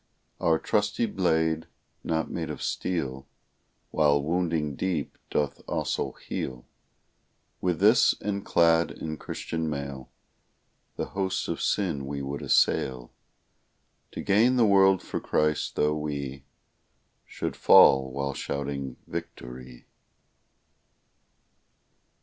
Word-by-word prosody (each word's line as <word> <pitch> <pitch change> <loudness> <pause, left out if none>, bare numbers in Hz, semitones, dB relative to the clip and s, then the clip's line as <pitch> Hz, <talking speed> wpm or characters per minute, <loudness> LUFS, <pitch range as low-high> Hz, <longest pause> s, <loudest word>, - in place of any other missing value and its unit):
Our 80 -1 +3
trusty 105 +6 0
blade, 80 -5 0 0.4
not 80 -1 -1
made - - -3
of - - -5
steel, 70 -7 -3 0.6
While 70 -2 +3
wounding 80 -3 -1
deep, 85 -2 -2
doth 75 -2 -1
also - - -2
heal; 60 -2 -6 1.0
With 90 -3 0
this, 110 +5 +5
and 100 -1 -3
clad 85 -1 +3
in 80 -1 -6
Christian 80 +3 -4
mail, 70 -3 -5 0.9
The - - -2
hosts 95 -1 -1
of - - -3
sin 80 -9 0
we 70 0 -4
would 70 +1 -4
assail, 60 -2 +1 1.0
To - - -5
gain 110 +6 +3
the 120 -2 +4
world 95 -2 +5
for - - -4
Christ, 75 0 0
tho' 75 0 +2
we 70 -3 -4 0.8
Should - - -4
fall 65 -1 +6
while 70 +1 -2
shouting 70 -2 -4
victory! 65 -7 -8
75 Hz, 110 wpm, -27 LUFS, 70-90 Hz, 1.0 s, fall